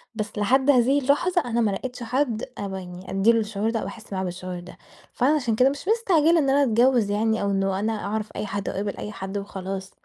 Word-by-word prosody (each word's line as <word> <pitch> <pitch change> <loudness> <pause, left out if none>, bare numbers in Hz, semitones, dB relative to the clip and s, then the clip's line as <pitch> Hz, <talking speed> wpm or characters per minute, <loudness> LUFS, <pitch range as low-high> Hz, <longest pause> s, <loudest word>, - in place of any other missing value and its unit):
بس 215 -1 -4
لحد 260 +7 +2
هذه 265 +2 +5
اللحظة 325 +7 +2
أنا 235 0 0
ما 210 -3 +2
لقيتش 250 +5 -5
حد 240 -2 -1
أب 200 -1 -4
يعني 180 0 -8
أدي 195 +4 +4
له 230 - +2
الشعور 215 0 -1
ده 225 - -1
أو - - -4
أحس 220 -2 -10
معاه 190 0 -1
بالشعور 180 0 -5
ده، 180 +1 -12 0.4
فأنا 280 +5 +3
عشان 240 -7 0
كده 255 +4 +5
مش 285 +6 -6
مستعجلة 345 -8 +3
إن 275 -3 +1
أنا 280 +1 +4
أتجوز 240 -3 +3
يعني 220 +1 +1
أو 200 0 0
إنه 195 -1 0
أنا 220 +2 0
أعرف 215 +1 -2
أي - - -3
حد، 200 0 -3
وأقابل 200 0 -3
أي 210 - -5
حد 195 0 -5
وخلاص. 195 -1 -5
220 Hz, 225 wpm, -24 LUFS, 195-260 Hz, 0.4 s, هذه